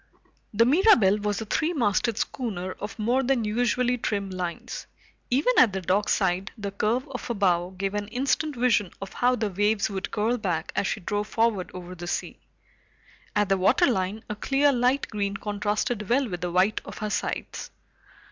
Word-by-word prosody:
The 230 Hz, +2 st, +4 dB
Mirabelle 250 Hz, -, +5 dB
was 210 Hz, +1 st, -1 dB
a -, -, -4 dB
three 315 Hz, +10 st, 0 dB
masted 230 Hz, -, +1 dB
schooner 195 Hz, -10 st, -3 dB
of 205 Hz, +3 st, -7 dB
more 240 Hz, +5 st, +2 dB
than 255 Hz, -3 st, +1 dB
usually 245 Hz, +3 st, +1 dB
trim 200 Hz, -3 st, -2 dB
lines. 180 Hz, -2 st, -5 dB, 0.4 s
Even 285 Hz, -, +3 dB
at 225 Hz, -6 st, +6 dB
the 190 Hz, -, -2 dB
dockside, 190 Hz, 0 st, +1 dB
the 200 Hz, -2 st, -4 dB
curve 225 Hz, +7 st, 0 dB
of 255 Hz, -, -6 dB
her 235 Hz, -, -2 dB
bow 180 Hz, -3 st, +2 dB
gave 195 Hz, +1 st, -2 dB
an 205 Hz, 0 st, -2 dB
instant 275 Hz, +6 st, 0 dB
vision 235 Hz, -6 st, +2 dB
of 195 Hz, -1 st, -7 dB
how 250 Hz, +1 st, +2 dB
the 215 Hz, -3 st, -2 dB
waves 205 Hz, +2 st, +1 dB
would 190 Hz, -1 st, -3 dB
curl 225 Hz, +3 st, 0 dB
back 175 Hz, -5 st, -2 dB
as 200 Hz, -, +1 dB
she 210 Hz, -, -2 dB
drove 205 Hz, +3 st, -2 dB
forward 225 Hz, -5 st, +1 dB
over 180 Hz, 0 st, -7 dB
the 175 Hz, -1 st, -8 dB
sea. -, -, -3 dB, 1.0 s
At 210 Hz, -1 st, +2 dB
the 195 Hz, -, +3 dB
waterline, 200 Hz, -, +2 dB
a 210 Hz, -, -4 dB
clear 275 Hz, +6 st, +2 dB
light 250 Hz, +3 st, +2 dB
green 200 Hz, -2 st, -2 dB
contrasted 210 Hz, +1 st, -2 dB
well 260 Hz, +2 st, +3 dB
with 175 Hz, -4 st, -5 dB
the 175 Hz, -1 st, -2 dB
white 185 Hz, +4 st, +2 dB
of -, -, -9 dB
her 215 Hz, -1 st, -3 dB
sides. -, -, -3 dB
210 Hz, 180 wpm, -26 LUFS, 195-245 Hz, 1.0 s, at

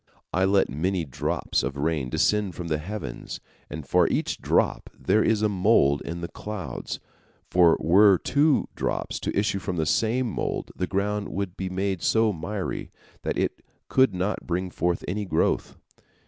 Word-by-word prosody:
I 95 Hz, +1 st, +3 dB
let 100 Hz, 0 st, +3 dB
many 85 Hz, +5 st, -1 dB
drops 65 Hz, -, -1 dB
of 70 Hz, +1 st, -3 dB
rain 75 Hz, -3 st, -1 dB
descend 105 Hz, +5 st, +1 dB
from 85 Hz, -1 st, -5 dB
the 75 Hz, -1 st, 0 dB
heavens, 105 Hz, +7 st, -6 dB, 0.3 s
and 75 Hz, -2 st, -7 dB
for -, -, +4 dB
each -, -, -1 dB
drop -, -, +1 dB
there 110 Hz, -, +3 dB
is 110 Hz, -1 st, +2 dB
a -, -, +5 dB
mould 90 Hz, -8 st, +3 dB
in 85 Hz, +1 st, -5 dB
the 85 Hz, -, -3 dB
clouds, 95 Hz, -, -6 dB, 0.5 s
for 85 Hz, -2 st, +5 dB
were 95 Hz, +3 st, +6 dB
two 145 Hz, -, +2 dB
drops -, -, -2 dB
to -, -, -3 dB
issue 100 Hz, -1 st, +1 dB
from 95 Hz, -1 st, -3 dB
the 80 Hz, -2 st, 0 dB
same 115 Hz, +9 st, +1 dB
mould, 110 Hz, -, -3 dB
the 90 Hz, -, -2 dB
ground 105 Hz, +1 st, -1 dB
would 100 Hz, -2 st, -3 dB
be 95 Hz, -1 st, -4 dB
made 95 Hz, -1 st, -1 dB
so 110 Hz, -1 st, +3 dB
miry 95 Hz, +4 st, -4 dB, 0.3 s
that -, -, -2 dB
it -, -, -1 dB, 0.3 s
could 130 Hz, -7 st, +4 dB
not 95 Hz, +3 st, -2 dB
bring 90 Hz, +1 st, -1 dB
forth 85 Hz, 0 st, -1 dB
any 105 Hz, +4 st, -2 dB
growth. 80 Hz, -5 st, 0 dB
95 Hz, 170 wpm, -26 LUFS, 85-105 Hz, 0.5 s, were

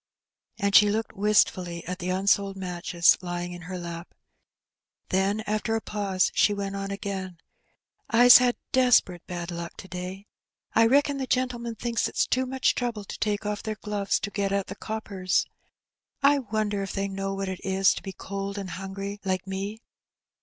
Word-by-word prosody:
And 200 Hz, -2 st, +1 dB
she 210 Hz, 0 st, +8 dB
looked 220 Hz, +1 st, -2 dB
wistfully 185 Hz, -4 st, +2 dB
at 180 Hz, +1 st, -5 dB
the 180 Hz, 0 st, -3 dB
unsold 195 Hz, +1 st, +2 dB
matches 175 Hz, -2 st, +2 dB
lying 175 Hz, 0 st, -4 dB
in 175 Hz, -, -9 dB
her 185 Hz, -, -4 dB
lap. 170 Hz, 0 st, -7 dB, 0.9 s
Then, 195 Hz, +3 st, +1 dB
after 215 Hz, +1 st, -1 dB
a -, -, +1 dB
pause 200 Hz, -4 st, 0 dB
she 205 Hz, -, +3 dB
went 200 Hz, 0 st, -3 dB
on 195 Hz, 0 st, -4 dB
again, 190 Hz, -2 st, -5 dB, 0.4 s
" -, -, -60 dB, 0.2 s
I's 245 Hz, 0 st, +9 dB
had 250 Hz, -1 st, +2 dB, 0.2 s
desp'rate 245 Hz, -9 st, +3 dB
bad 175 Hz, -1 st, -5 dB
luck 170 Hz, 0 st, -6 dB
to -, -, -9 dB
day, 185 Hz, +2 st, -6 dB, 0.5 s
I 225 Hz, 0 st, +5 dB
reckon 280 Hz, +2 st, +3 dB
the 265 Hz, -, -3 dB
gen'lmen 240 Hz, -2 st, -1 dB
thinks 235 Hz, 0 st, 0 dB
it -, -, -15 dB, 0.2 s
too 255 Hz, 0 st, +2 dB
much 265 Hz, 0 st, +2 dB
trouble 235 Hz, -4 st, -3 dB
to -, -, -8 dB
take 210 Hz, -1 st, -1 dB
off 210 Hz, 0 st, -2 dB
their 220 Hz, -1 st, -4 dB
gloves 205 Hz, -2 st, -1 dB
to 200 Hz, -, -3 dB
get 200 Hz, -1 st, -1 dB
at 200 Hz, -1 st, 0 dB
the 195 Hz, -, -7 dB
coppers. 200 Hz, -4 st, -1 dB, 0.8 s
1 280 Hz, -3 st, +3 dB
wonder 210 Hz, -2 st, 0 dB
if 195 Hz, -, -4 dB
they 195 Hz, 0 st, -1 dB
know 195 Hz, 0 st, -3 dB
what 195 Hz, 0 st, -3 dB
it 190 Hz, -1 st, -5 dB
is 190 Hz, 0 st, +3 dB
to -, -, -7 dB
be 195 Hz, -, -6 dB
cold 195 Hz, +1 st, -5 dB
and 195 Hz, -3 st, -5 dB
hungry 195 Hz, +2 st, -5 dB
like 185 Hz, -1 st, -1 dB
me 195 Hz, +4 st, -5 dB
200 Hz, 180 wpm, -26 LUFS, 185-215 Hz, 0.9 s, I's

